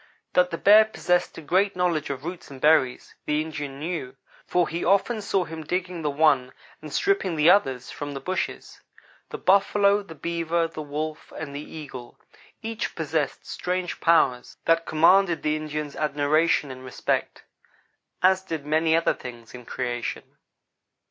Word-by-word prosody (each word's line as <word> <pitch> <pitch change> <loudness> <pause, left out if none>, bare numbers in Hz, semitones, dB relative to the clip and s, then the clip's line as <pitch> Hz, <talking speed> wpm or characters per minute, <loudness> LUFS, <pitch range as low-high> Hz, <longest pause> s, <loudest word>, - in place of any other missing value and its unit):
That 180 0 +4
the 165 - -4
bear 210 +4 +7
possessed 180 -4 0
a - - -7
great 190 +6 +2
knowledge 175 -4 0
of 140 +1 -5
roots 175 +1 -7
and 135 -2 -10
berries, 135 -4 +2
the 150 0 +1
Indian 145 -3 -5
knew, 150 -4 -4 0.3
for 180 -1 +2
he 170 +2 -3
often 200 +4 +2
saw 195 -2 0
him 160 -1 -7
digging 180 +2 -3
the 150 - 0
one 140 -4 +2 0.3
and - - -9
stripping 395 - +1
the 155 +3 +6
others 135 -11 +1
from 145 -1 -6
the - - -4
bushes. 185 +6 -4 0.5
The - - -5
buffalo, 200 +1 +3
the 175 -5 -11
beaver, 170 +1 -1
the 155 -1 -7
wolf, 150 +1 -5
and 140 -3 -6
the 145 - -4
eagle 140 -6 -9 0.5
each 225 0 -4
possessed 155 -3 -2
strange 180 0 -3
powers 130 -7 +2
that 165 0 +2
commanded 170 +1 +4
the 150 0 +1
Indian's 150 -1 -4
admiration 150 0 +1
and 130 0 -10
respect, 130 - -2 0.8
as 190 0 +5
did 160 -6 -5
many 160 +2 +2
other 165 - +2
things 120 -2 -10
in 125 -1 -10
creation. 120 -1 -3
160 Hz, 160 wpm, -25 LUFS, 145-180 Hz, 0.8 s, bear